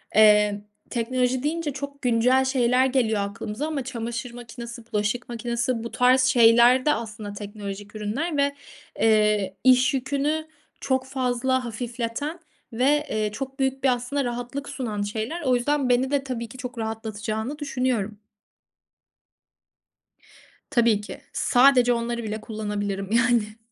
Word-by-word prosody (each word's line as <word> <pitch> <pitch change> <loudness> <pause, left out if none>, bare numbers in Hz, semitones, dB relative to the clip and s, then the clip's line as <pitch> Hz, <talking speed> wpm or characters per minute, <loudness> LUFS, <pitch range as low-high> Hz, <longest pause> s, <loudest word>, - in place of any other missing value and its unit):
eee, 210 -1 +5 0.3
teknoloji 250 +2 0
deyince 305 -1 -1
çok 280 +1 -7
güncel 250 +2 +3
şeyler 255 -1 +3
geliyor 240 -6 +1
aklımıza 210 +7 -4
ama 300 -4 -2
çamaşır 235 -1 -5
makinesi, 235 0 -9
bulaşık 215 +4 -1
makinesi, 235 0 -2
bu 235 - -6
tarz 250 +1 +4
şeyler 245 0 +6
de, 300 - +4
aslında, 215 -2 -6
teknolojik 205 0 -7
ürünler 265 +10 -2
ve, 280 0 +1 0.4
eee, 210 -3 +3
iş 255 0 +5
yükünü 285 +4 -1 0.3
çok 260 -1 0
fazla 260 -1 0
hafifleten 240 +7 -4 0.3
ve, 285 +6 +2
eee, 215 -1 -1
çok 270 +5 -6
büyük 265 0 0
bir, 270 - +5
aslında, 250 +4 -2
rahatlık 245 +3 -4
sunan 220 -6 -3
şeyler. 220 +11 -3
O 260 -5 +2
yüzden 270 +2 0
beni 250 +2 +2
de, 285 -1 +1
tabii 245 -3 -4
ki, 255 - -11
çok 250 -1 -7
rahatlatacağını 220 +3 -4
düşünüyorum. 250 -7 -2 2.5
Tabii 230 -4 +3
ki. 210 - -9
Sadece 250 -1 +5
onları 235 0 -2
bile 215 0 -4
kullanabilirim, 205 -2 -4
yani. 230 -2 +2
245 Hz, 130 wpm, -24 LUFS, 220-265 Hz, 2.5 s, şeyler